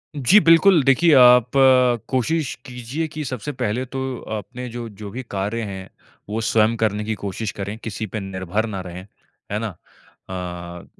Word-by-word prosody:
जी 145 - +5
बिल्कुल, 165 -1 +6
देखिए 140 +5 +4
आप 125 -2 +7 0.6
कोशिश 140 +3 0
कीजिए 125 +6 -4
कि 155 - -4
सबसे 130 +2 -4
पहले 125 -1 -2
तो 135 +1 -6 0.4
अपने 125 +5 -7
जो 120 0 -6
जो 105 0 -9
भी 130 +4 -6
कार्य 105 +4 -2
हैं, 95 -3 -6 0.4
वो 110 +2 -2
स्वयं 110 0 +2
करने 105 -2 0
की 110 +1 -2
कोशिश 100 +2 -3
करें, 100 +2 -6
किसी 110 0 -4
पे 110 - -5
निर्भर 95 +2 -3
ना 100 -3 -4
रहें। 90 +1 -9 0.4
है 105 - -1
ना? 115 - -2
अ, 90 -1 -9
110 Hz, 165 wpm, -22 LUFS, 100-130 Hz, 0.6 s, आप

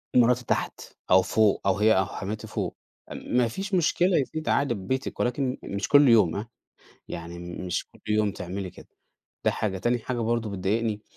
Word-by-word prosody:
مراتي 125 0 +4
تحت، - - -1 0.3
أو 95 0 +8
فوق، 110 +2 +2
أو 95 0 +2
هي 110 +1 +5
أو 95 - +3
حماتي 105 +4 -5
فوق، - - -3 0.4
ما 125 -1 0
فيش 195 - -5
مشكلة 180 +1 +3
يا 140 - +3
ستي 155 - -8
أنتِ 155 - -4
قاعدة 140 -4 +2
في 100 - -7
بيتك 130 +8 -3
ولكن 125 +1 0
مش 100 0 -3
كل 145 0 +6
يوم 105 -8 +5
هاه، 105 +3 -4 0.6
يعني 85 +1 -7
م 90 +1 -7
مش 90 - -2
كل - - -20
يوم 105 -1 +2
تعملي 90 0 -5
كده. - - -15 0.6
ده - - +4
حاجة، 95 -3 -2
تاني 120 +5 +1
حاجة 120 +1 -3
برضه 115 -1 0
بتضايقني 105 +3 -1
110 Hz, 195 wpm, -26 LUFS, 95-125 Hz, 0.6 s, أو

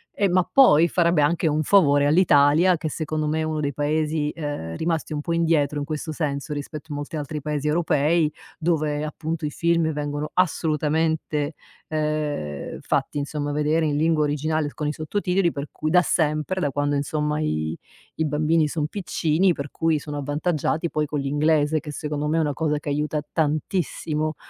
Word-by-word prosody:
Ehm, 200 -3 +1
ma 180 -1 +2
poi 170 - +6
farebbe 170 -4 +3
anche 165 +2 +1
un 155 0 +1
favore 145 -6 +4
all'Italia, 160 +2 +5
che 155 - -4
secondo 155 0 -2
me 155 +1 0
è - - 0
uno 155 -1 -2
dei 145 -2 -1
Paesi, 150 +1 0
ehm, 145 - -5
rimasti 160 -1 -2
un 150 - -2
po' 170 - -2
indietro 160 -3 +1
in 145 - -3
questo 155 +1 -4
senso, 150 -1 -3
rispetto 150 +2 -7
a 145 - -3
molti 145 +3 -5
altri 150 0 -4
paesi 150 0 -2
europei 155 0 +2 0.3
dove, 155 -3 0
appunto, 155 +1 -4
i - - -1
film 170 0 +1
vengono 145 0 -3
assolutamente, 155 -2 0 0.3
ehm, 150 - -2
fatti - - -1
insomma 145 0 -3
vedere 150 +2 +1
in 145 - 0
lingua 155 0 +2
originale 150 +1 0
l - - -8
con 150 - -3
i 150 - -1
sottotitoli, 180 +2 0
per 140 +1 -6
cui 155 - -3
da 180 +2 +5
sempre, 155 +3 0
da 145 - +1
quando 145 +1 0
insomma 150 +1 -1
i 80 - -1 0.4
i 160 - +1
bambini 155 +1 +2
son 150 0 -2
piccini 175 0 +1
per 140 -2 -6
cui 165 -1 +1
sono 145 0 -6
avvantaggiati 155 +3 -1
poi 150 -1 0
con 150 - -2
l'inglese 150 +2 +2
che, 150 -1 -8
secondo 150 0 -3
me, 160 +2 +1
è - - +3
una 150 -2 0
cosa 150 +1 0
che 145 - -5
aiuta 150 +1 -1
tantissimo 155 0 -1
150 Hz, 180 wpm, -24 LUFS, 145-160 Hz, 0.4 s, poi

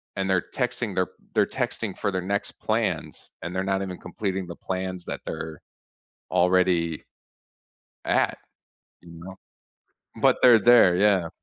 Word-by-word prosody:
and 95 0 -1
they're 95 -2 +1
texting 125 -5 -2
their 95 -1 +1 0.3
they're - - +4
texting - - -3
for 100 - -1
their 95 -1 -2
next 100 +3 -2
plans, - - -2
and 85 +2 -5
they're 95 - 0
not 95 0 0
even 90 -2 -6
completing 95 -4 -4
the 85 - -7
plans 95 -1 -4
that - - -5
they're 80 -2 -6 0.7
already 90 -3 +2 1.0
at, - - +1 0.7
you 85 - -14
know? 95 +1 -9 0.9
But - - +4
they're 120 -3 +8
there, 115 -5 +6
yeah. 95 -3 +3
95 Hz, 140 wpm, -25 LUFS, 90-100 Hz, 1.0 s, they're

